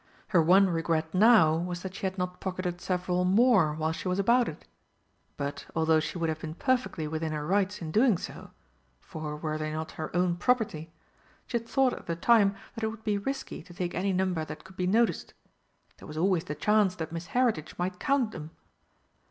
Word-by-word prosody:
Her 180 -6 +4
one 190 +5 +5
regret 165 -2 -1
now 185 -6 +6
was 175 +1 -4
that 190 -1 -5
she 190 - -2
had 190 +1 -6
not 180 0 -3
pocketed 180 -2 -4
several 180 -1 0
more 190 -5 +4
while 160 0 -1
she 165 - -5
was 180 0 0
about 235 +5 +3
it. 155 - -11 0.7
But, 140 0 -4
although 160 -1 +3
she 155 +3 -4
would 165 -1 0
have 160 -1 -2
been 160 0 -6
perfectly 255 - 0
within 160 0 -3
her 150 -1 -3
rights 195 +2 0
in 155 - -5
doing 220 +1 +4
so - - -8 0.5
for 155 - -6
were 155 0 -3
they 155 0 -3
not 155 +1 -4
her 155 - -5
own 175 -1 +2
property? 175 -8 0 0.5
she 235 - -1
had 230 0 -16
thought 265 -2 +3
at - - -9
the 170 - -1
time 200 +2 +4 0.2
that 225 - -7
it - - +2
would 220 0 -7
be 210 -2 0
risky 270 +6 -4
to 175 0 -15
take 180 -2 -3
any 195 +2 0
number 185 -3 0
that 155 0 -8
could 190 0 -15
be 180 -1 -1
noticed. 225 +5 +1 0.6
There - - -11
was 150 - -8
always 180 0 +1
the 150 - -4
chance 205 +4 +2
that 160 -2 -5
Miss 165 +1 -6
Heritage 225 -12 +1
might 180 +1 -3
count 270 -5 +1
them! 155 -4 -8
180 Hz, 210 wpm, -28 LUFS, 160-205 Hz, 0.7 s, now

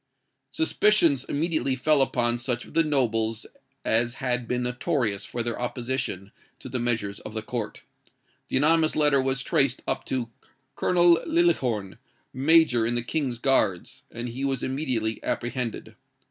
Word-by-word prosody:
"Suspicions 210 - +2
immediately 155 -3 -1
fell 145 +2 +3
upon 120 -2 +1
such 120 0 -2
of - - -15
the 165 - +4
nobles 115 -7 0 0.4
as 120 +2 +2
had 125 -3 -1
been 125 +1 -1
notorious 125 - -1
for 120 - -3
their 120 +1 -3
opposition 120 -6 -3 0.3
to - - -10
the 130 - -3
measures 115 -4 -1
of 110 - -9
the 110 - -3
court. 110 -2 -5 0.6
The - - 0
anonymous 155 +3 +3
letter 145 -3 +3
was 130 -1 -1
traced 135 -2 +1
up - - -1
to 120 -3 -3 0.4
Colonel 175 -2 +4
Liljehorn, 130 - +1 0.3
Major 140 -3 +4
in 120 +2 0
the 120 - 0
King's 130 -2 -2
Guards, 110 -8 0
and 120 +1 -6
he 130 +4 -5
was 135 -2 -1
immediately 130 -5 -2
apprehended. 120 -1 -3
125 Hz, 145 wpm, -26 LUFS, 115-145 Hz, 0.6 s, the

